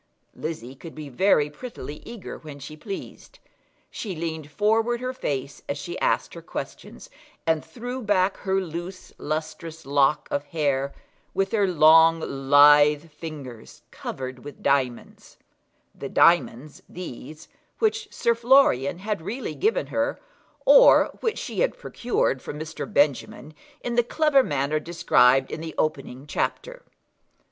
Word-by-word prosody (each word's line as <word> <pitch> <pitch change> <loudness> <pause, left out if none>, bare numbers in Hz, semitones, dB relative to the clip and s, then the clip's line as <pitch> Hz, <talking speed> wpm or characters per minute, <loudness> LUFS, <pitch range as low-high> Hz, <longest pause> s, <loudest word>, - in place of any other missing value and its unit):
Lizzie 145 -6 -6
could 160 +5 -12
be 155 -2 -8
very 150 +1 +3
prettily 150 - -8
eager 235 -4 -8
when 150 -3 -10
she 140 +2 -9
pleased. 200 - -9 0.5
She 200 -5 -5
leaned 160 -2 -5
forward 220 +7 +1
her 255 +1 -3
face 140 - -4
as 140 - -2
she 175 +5 -6
asked - - 0
her - - -9
questions, - - -8 0.4
and 160 -1 +1
threw 245 +2 -6
back 200 -3 +1
her 190 0 0
loose 180 +1 -7
lustrous 155 +1 -5
lock 140 +1 +2
of 145 - -1
hair, 140 -3 -1 0.4
with 195 - 0
her 205 -3 +2
long 165 -1 +6
lithe 145 +2 +5
fingers 145 -7 -10
covered 130 -1 -7
with 145 - -11
diamonds, 130 -4 -1 0.6
the - - -7
diamonds, 150 -4 +2
these, 155 -3 -9 0.3
which 435 -1 0
Sir 235 - +1
Florian 235 - +3
had 205 0 -3
really 235 +10 -5
given 450 +5 0
her, - - 0 0.5
or - - +7
which 450 -3 -1
she - - -5
had - - +1
procured 240 - -1
from 145 - -7
Mr. 160 +7 -6
Benjamin 145 -2 0 0.3
in 240 - -2
the 240 0 +3
clever 295 +2 +3
manner 145 - -1
described 135 -5 +3
in 155 - -5
the 160 -1 -7
opening 135 -3 -2
chapter. - - -3
160 Hz, 135 wpm, -24 LUFS, 145-210 Hz, 0.6 s, or